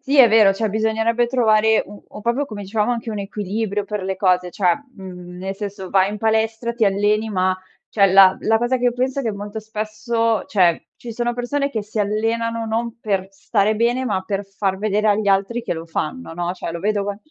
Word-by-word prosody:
Sì, 275 +1 0
è 240 -3 +9
vero. 215 -3 +6
Cioè, 215 +2 -1
bisognerebbe 225 +2 +1
trovare 220 -3 +3
u 205 0 -12
u - - -10
proprio 240 +6 0
come 210 -4 -7
dicevamo 210 +3 0
anche 235 -1 -3
un 210 -2 -3
equilibrio 205 +1 -3
per 210 -1 -4
le 190 0 -3
cose. 180 -2 +2
Cioè, 180 -2 +2 0.2
mhmm, 180 -2 -9
nel 190 +1 -4
senso, 200 -2 -6
vai 190 +1 +3
in 210 - -5
palestra, 225 +1 0
ti 230 -2 +1
alleni, 205 +2 +1
ma 185 -1 +1 0.3
cioè, 200 -2 +4
la 190 -1 +7
la 220 0 +2
cosa 240 +2 +1
che 250 - -3
io 245 - +3
penso 260 +2 -1
è - - -5
che, 225 - -1
molto 205 +2 -6
spesso, 220 +1 -1
cioè, 175 -5 +2
ci 235 -1 -8
siano 240 +1 -1
persone 275 +4 -1
che 220 -4 -2
si 215 +1 -3
allenano 225 +2 -1
non 230 +1 -2
per 195 -3 -1
stare 200 +2 0
bene, 240 +3 +1
ma 200 -6 0
per 200 +1 -3
far 195 -1 -2
vedere 210 +1 0
agli 205 0 +2
altri 200 +5 +1
che 225 - -2
lo 165 0 -6
fanno, 165 +5 -4
no, 175 0 -2
cioè, 165 - -5
lo 170 - -5
vedo 205 0 0
qua 200 0 -3
215 Hz, 220 wpm, -21 LUFS, 195-230 Hz, 0.3 s, è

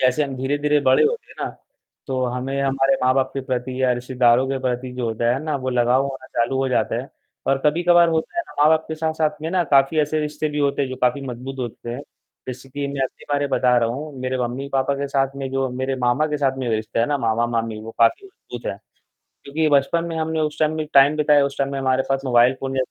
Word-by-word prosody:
जैसे 130 +3 +3
हम 135 -2 -5
धीरे-धीरे 145 +3 +1
बड़े 130 -2 +4
होते 470 +1 -1
हैं - - -14
ना, - - -2 0.6
तो 130 -1 -1
हमें 130 +3 -2
हमारे 135 0 +2
माँ-बाप 130 +1 +2
के 135 - -3
प्रति 130 0 -3
या 130 - +3
रिश्तेदारों 125 0 +2
के 135 0 -1
प्रति 125 0 -2
जो 125 -1 -3
होता 115 +1 0
है 130 - -2
ना, 155 -2 -1
वो 130 -1 -3
लगाव 125 +1 +3
होना 135 -1 -6
चालू 120 +3 -1
हो 135 0 +1
जाता 130 - 0
है - - -12 0.4
और 135 - +3
कभी-कभार 170 +2 +4
होता 160 - -2
है - - +2
ना - - -13
माँ-बाप 155 +1 +4
के 160 - -4
साथ-साथ 155 -1 -1
में 160 - -3
ना 185 -2 +2
काफ़ी 140 +3 +4
ऐसे 150 +1 +1
रिश्ते 150 0 -2
भी 150 0 -3
होते 140 0 +1
हैं 135 - -1
जो 130 - -5
काफ़ी 125 +3 +2
मज़बूत 125 +2 -6
होते 120 -1 -6
हैं। 125 +4 -5 0.5
जैसे 130 +1 -7
कि 140 +1 -4
मैं 140 -1 -3
अपने 130 - -7
बारे 145 0 +1
में - - -15
बता 125 -1 +3
रहा 115 -1 +2
हूँ, 145 +5 -5
मेरे 130 0 -2
मम्मी-पापा 135 +3 -1
के 140 0 -3
साथ 135 0 0
में 135 -1 -4
जो 135 0 0
मेरे 130 +2 -2
मामा 125 +5 +2
के 150 -1 -2
साथ 135 -2 0
में 130 - -3
जो 115 - +1
रिश्ता 110 +1 -3
है 115 - +3
ना, 145 +1 0
मामा-मामी, 115 -2 -1
वो 115 - -8
काफ़ी 115 - +3
मज़बूत 385 - -11
है। - - -8 0.7
क्योंकि 155 +3 0
बचपन 150 +4 +2
में 165 -1 -4
हमने 160 0 -1
उस 150 0 -2
टाइम 155 -1 +2
में 155 - -2
टाइम 140 +2 +6
बिताया, 150 -1 +4
उस 140 0 -4
टाइम 140 0 0
में 140 - -2
हमारे 130 0 +1
पास 135 0 0
मोबाइल 125 0 +4
फ़ोन 135 0 -3
जैसा 130 -1 +1
135 Hz, 250 wpm, -22 LUFS, 125-150 Hz, 0.7 s, टाइम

